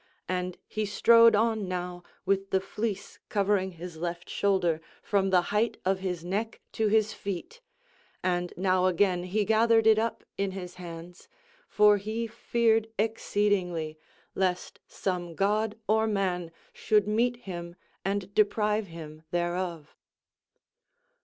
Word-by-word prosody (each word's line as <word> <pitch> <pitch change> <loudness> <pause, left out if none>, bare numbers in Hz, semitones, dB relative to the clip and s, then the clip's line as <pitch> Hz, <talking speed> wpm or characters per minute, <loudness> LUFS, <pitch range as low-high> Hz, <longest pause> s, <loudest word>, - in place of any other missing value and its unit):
And 180 -1 -2
he 215 -1 -2
strode 230 +2 +6
on 220 -2 +1
now 180 -1 -4 0.2
with 195 0 +1
the 190 - +2
fleece 200 +1 -4
covering 195 -2 +1
his 175 0 -8
left 175 +1 -4
shoulder 175 -5 +1 0.2
from 195 -2 +1
the 185 -1 +5
height 220 +3 +1
of 190 0 +2
his 180 -3 -3
neck 210 +5 -2
to 220 -2 0
his 215 0 +2
feet, 200 - -6 0.6
and 175 -1 0
now 185 0 +2
again 180 -1 +2
he 205 +3 0
gathered 225 +1 +4
it 220 -1 +6
up 230 +1 -2 0.2
in 195 -1 0
his 180 -2 -7
hands; 175 +1 -9 0.4
for 210 0 +5
he 215 +3 -3
feared 225 -1 +1
exceedingly, 195 -7 0 0.3
lest 185 -1 -1
some 175 -3 -3
god 210 +3 +1
or 220 +1 +3
man 185 -5 -1 0.2
should 210 -2 +2
meet 235 +3 +2
him 175 -6 -7 0.3
and 195 0 -2
deprive 210 0 +2
him 155 -2 -10
thereof. 175 -2 -2
195 Hz, 135 wpm, -28 LUFS, 180-215 Hz, 0.6 s, strode